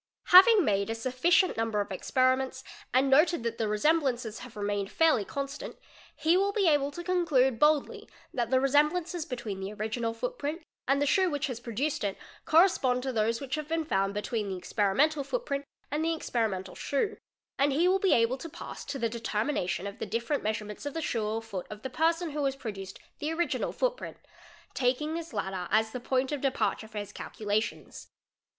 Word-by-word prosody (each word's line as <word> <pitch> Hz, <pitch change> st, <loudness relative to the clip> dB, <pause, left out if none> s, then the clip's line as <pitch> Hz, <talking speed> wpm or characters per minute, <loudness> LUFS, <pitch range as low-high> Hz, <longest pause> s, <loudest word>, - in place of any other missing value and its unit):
Having 390 Hz, +1 st, +9 dB
made 200 Hz, -1 st, +1 dB
a 225 Hz, -, -1 dB
sufficient 260 Hz, -, +2 dB
number 225 Hz, -2 st, 0 dB
of 205 Hz, 0 st, -2 dB
"experiments 260 Hz, +5 st, +1 dB, 0.3 s
and 260 Hz, +2 st, +3 dB
noted 300 Hz, +1 st, +4 dB
that 230 Hz, -1 st, -3 dB
the 220 Hz, -, +1 dB
resemblances 240 Hz, -1 st, +1 dB
have 245 Hz, -3 st, -11 dB
remained 205 Hz, -1 st, -2 dB
fairly 315 Hz, -10 st, +3 dB
con 275 Hz, +7 st, -3 dB
"stant, 280 Hz, +2 st, -8 dB, 0.4 s
he 325 Hz, +2 st, +2 dB
will 395 Hz, +2 st, +2 dB
be 400 Hz, -3 st, +1 dB
able 290 Hz, -3 st, +3 dB
to 345 Hz, +4 st, -7 dB
conclude 305 Hz, -9 st, +2 dB
boldly 300 Hz, -1 st, +2 dB, 0.2 s
that 240 Hz, -3 st, -1 dB
the 260 Hz, 0 st, +4 dB
resemblances 305 Hz, +5 st, +1 dB
between 240 Hz, -8 st, -5 dB
the 195 Hz, +1 st, -4 dB
original 220 Hz, +2 st, -2 dB
footprint 325 Hz, -, -4 dB, 0.2 s
and 275 Hz, +1 st, +3 dB
the 290 Hz, -, +2 dB
shoe 375 Hz, +5 st, +3 dB
which 290 Hz, -1 st, -1 dB
has 250 Hz, -5 st, -4 dB
produced 250 Hz, +5 st, -2 dB
it 200 Hz, -2 st, -2 dB, 0.3 s
correspond 310 Hz, -7 st, +4 dB
to 265 Hz, -1 st, -2 dB
those 225 Hz, +1 st, +1 dB
Which 270 Hz, -1 st, -6 dB
have 305 Hz, 0 st, -2 dB
been 325 Hz, 0 st, -1 dB
found 195 Hz, -7 st, 0 dB
between 210 Hz, 0 st, -2 dB
the 190 Hz, -, -3 dB
experimental 230 Hz, -, +1 dB
footprint 285 Hz, -, -3 dB, 0.3 s
and 300 Hz, +2 st, 0 dB
the 330 Hz, 0 st, +1 dB
ex 315 Hz, -, -8 dB
'perimental 195 Hz, -6 st, -1 dB
shoe; 340 Hz, +10 st, -1 dB, 0.4 s
and 280 Hz, +1 st, +3 dB
he 320 Hz, +6 st, +3 dB
will 380 Hz, +1 st, +3 dB
be 385 Hz, -1 st, +3 dB
able 235 Hz, +3 st, +2 dB
to 330 Hz, -, -7 dB
pass -, -, -8 dB
to 285 Hz, -1 st, -4 dB
the 235 Hz, -3 st, 0 dB
determination 220 Hz, -4 st, -2 dB
of 200 Hz, 0 st, -7 dB
the -, -, -4 dB
different 235 Hz, +8 st, -1 dB
measurements 210 Hz, +3 st, -4 dB
of 285 Hz, -, -6 dB
the 325 Hz, -, -2 dB
shoe 230 Hz, -6 st, -1 dB
or 225 Hz, +1 st, -2 dB
foot 200 Hz, -5 st, -6 dB
of 210 Hz, 0 st, -9 dB
the 265 Hz, -, -4 dB
person 330 Hz, +3 st, +1 dB
who 295 Hz, 0 st, -2 dB
has 270 Hz, -1 st, 0 dB
produced 200 Hz, -7 st, -7 dB, 0.2 s
the 300 Hz, +2 st, -2 dB
original 340 Hz, +1 st, -1 dB
footprint, -, -, -2 dB, 0.6 s
taking 265 Hz, +5 st, 0 dB
this 335 Hz, 0 st, -5 dB
latter 190 Hz, -4 st, -3 dB
as 220 Hz, +1 st, +2 dB
the 250 Hz, -, -4 dB
point 260 Hz, +2 st, 0 dB
of 290 Hz, -2 st, -2 dB
departure 265 Hz, -4 st, 0 dB
for 215 Hz, -1 st, -10 dB
his 205 Hz, -1 st, -5 dB
'ealculations. 215 Hz, +1 st, -3 dB
260 Hz, 195 wpm, -29 LUFS, 220-310 Hz, 0.6 s, Having